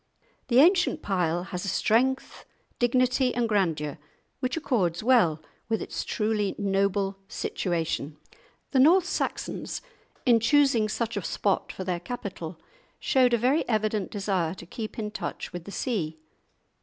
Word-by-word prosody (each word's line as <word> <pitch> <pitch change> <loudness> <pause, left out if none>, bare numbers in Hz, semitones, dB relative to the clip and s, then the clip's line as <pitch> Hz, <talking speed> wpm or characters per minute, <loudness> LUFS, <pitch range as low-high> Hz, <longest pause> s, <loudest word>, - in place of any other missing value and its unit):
The 245 -1 +2
ancient 355 +6 +5
pile 175 -3 0
has 180 -1 -5
a - - -4
strength, 250 +7 +1 0.4
dignity, 250 +1 +2
and 240 -1 +1
grandeur 165 -8 0 0.4
which 255 +3 -1
accords 195 - 0
well 180 -11 +3 0.3
with 225 - +1
its - - -4
truly 210 -2 -1
noble 195 0 0
situation. 160 -6 -2 0.5
The 270 - +3
North 340 +7 +6
Saxons 365 - -3 0.5
in 240 -3 +5
choosing 255 -3 +3
such 230 +2 -2
a - - -1
spot - - -1
for 190 - -6
their 180 -2 -2
capital 180 -5 -6 0.4
showed 250 -2 +3
a - - +1
very 255 +7 +2
evident 215 -3 0
desire 190 -5 -1
to 175 - -10
keep 215 +5 -7
in 210 -2 -3
touch - - -5
with 175 -1 -6
the 200 - -8
sea. 180 - -2
210 Hz, 145 wpm, -27 LUFS, 180-250 Hz, 0.5 s, North